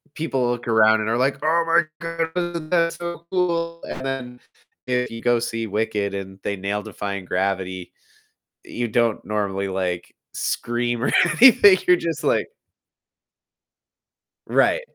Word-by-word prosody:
people 135 -6 -1
look 120 0 -5
around 110 -1 +4
and 110 - -2
are 115 - +1
like, 130 +2 +1
"Oh 165 +2 +3
my 165 +1 +4 0.2
god. 165 0 -3
That's 170 -1 +2
so 170 -1 -6
cool!" 170 -2 -1
and 130 - -6
then 125 -2 -5 0.5
if 125 -1 0
you 115 0 -8
go 120 0 +2
see 115 -1 -3
Wicked 105 -1 -1
and 95 -1 -7
they 100 - -2
nail 100 +2 -3
Defying 100 -2 -5
Gravity, 95 -1 -2 0.7
you 120 0 -4
don't 115 0 +1
normally, 100 -2 -2
like, 90 -2 -3 0.2
scream 120 0 -2
or - - 0 0.3
anything. 205 -6 +8
You're 180 - +6
just 165 -2 -4
like - - +1 2.0
Right. - - +3
120 Hz, 140 wpm, -22 LUFS, 105-165 Hz, 2.0 s, anything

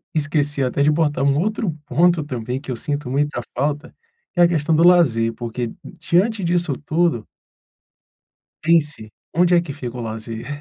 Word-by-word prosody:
esqueci 145 -2 0
até 130 +2 0
de 150 - +4
botar 150 -3 +1
um 140 +1 +2
outro 210 0 -1 0.2
ponto 170 0 +3
também 125 -1 -4
que 140 - -12
eu - - -2
sinto 145 +1 -4
muita 145 -1 -1 0.2
falta, 145 +3 -2 0.4
é 175 - +5
a - - +7
questão 160 -1 +1
do 165 - +4
lazer 115 -11 +4
porque 120 0 -5 0.3
diante 200 +3 +1
disso 170 -4 0
tudo 160 -8 0 1.4
pense, 150 -9 +1 0.2
onde 175 +1 +4
é - - +5
que 160 -5 -6
fica 125 -4 -7
o - - -5
lazer? 110 0 -6
145 Hz, 165 wpm, -21 LUFS, 125-170 Hz, 1.4 s, a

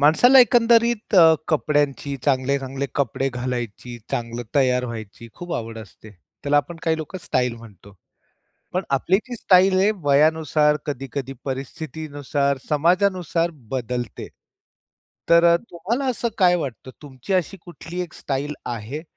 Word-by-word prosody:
माणसाला 245 - +6
एकंदरीत 235 -2 +3
अ, 165 -3 +8
कपड्यांची 145 -2 0
चांगले-चांगले 135 0 0
कपडे 135 0 0
घालायची, 120 -2 -5
चांगलं 115 0 -3
तयार 125 -3 +2
व्हायची, 115 -1 -8
खूप 175 -1 -7
आवड 115 0 -5
असते. 110 0 -13 0.3
त्याला 145 +1 +2
आपण 165 +4 0
काही 160 -1 +1
लोकं 160 +4 -6
स्टाइल 125 -2 0
म्हणतो. 100 -4 -15 0.8
पण 185 - 0
आपली 140 +7 +2
जी 250 - -6
स्टाईल 190 -2 +4
हे, 195 +3 +4
वयानुसार 150 +1 +3
कधी-कधी 135 -1 -5
परिस्थितीनुसार, 140 0 -3
समाजानुसार 175 +2 +1 0.2
बदलते. 125 -1 -4 1.0
तर 170 0 +6
अ, - - +5
तुम्हाला 225 +11 -2
असं 240 -1 -2
काय 180 -2 +5
वाटतं 130 -4 -6
तुमची 135 +4 -7
अशी 185 +1 0
कुठली 175 +1 -8
एक 170 - -9
स्टाइल 145 +2 -3
आहे, 120 +6 -5
145 Hz, 130 wpm, -22 LUFS, 130-175 Hz, 1.0 s, अ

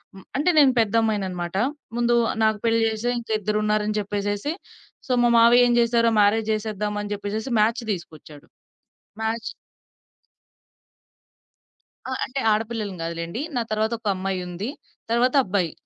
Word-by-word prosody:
హ్మ్ 190 - -12
అంటే 300 +5 +2
నేను 270 -3 +6
పెద్ద 220 -1 +1
అమ్మాయన్నమాట. 190 -5 -2 0.4
ముందు 240 0 +2 0.3
నాకు 220 -1 +3
పెళ్ళి 230 0 +3
జేసియ్ 225 +2 -1
ఇంకా 225 -1 -4
ఇద్దరున్నారు 210 +1 0
అని 215 - -1
జెప్పేసేసి, 205 +7 -2 0.5
సో - - -3
మా 240 - +4
మావయ్య 240 +2 +6
ఏం 240 - +2
జేసారు? 235 0 +3
మ్యారేజ్ 220 +2 +2
జేసేద్దాం 210 -1 -3
అని 205 0 -6
జెప్పేసేసి 210 +4 -4
మ్యాచ్ 230 +3 +1
దీసుకొచ్చాడు. 155 -5 -8 0.8
మ్యాచ్ 225 +1 -2 2.6
ఆ! - - -5
అంటే 270 +2 -4
ఆడపిల్లలం 215 -2 -2
గాదులెండి. 170 +6 -4
నా 245 - +1
తర్వాత 220 +2 0
ఒక 225 - -7
అమ్మాయుంది. 185 +2 -4 0.4
తర్వాత 245 +2 +2
అబ్బాయి 185 -5 -1
215 Hz, 130 wpm, -23 LUFS, 200-230 Hz, 2.6 s, నేను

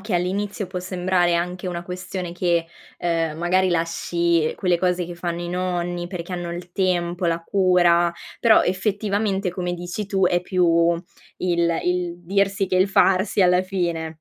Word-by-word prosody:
che 205 -1 -4
all'inizio 195 +3 -1
può 180 0 -5
sembrare 180 -1 +1
anche 180 +2 -2
una 175 -1 -3
questione 180 0 -5
che, 175 -1 +1 0.3
ehm, 165 -2 -1
magari 185 +3 +2
lasci 170 -1 0
quelle 180 -3 +1
cose 180 -1 +1
che 175 0 -7
fanno 175 0 -4
i 175 - -5
nonni 175 -1 -2
perché 175 0 -6
hanno 175 -1 -4
il 175 0 -8
tempo, 175 -2 0
la 165 0 0
cura, 175 -2 +3 0.3
però 230 -2 +6
effettivamente 200 0 0
come 180 0 -3
dici 175 +4 -5
tu 195 -2 +1
è 175 0 +2
più 180 0 0 0.7
il 170 -2 +1
il 180 -1 0
dirsi 195 +1 +1
che 185 - 0
il 190 +2 +3
farsi 195 +1 +3
alla 180 0 +4
fine. 170 -4 -2
180 Hz, 160 wpm, -22 LUFS, 175-185 Hz, 0.7 s, però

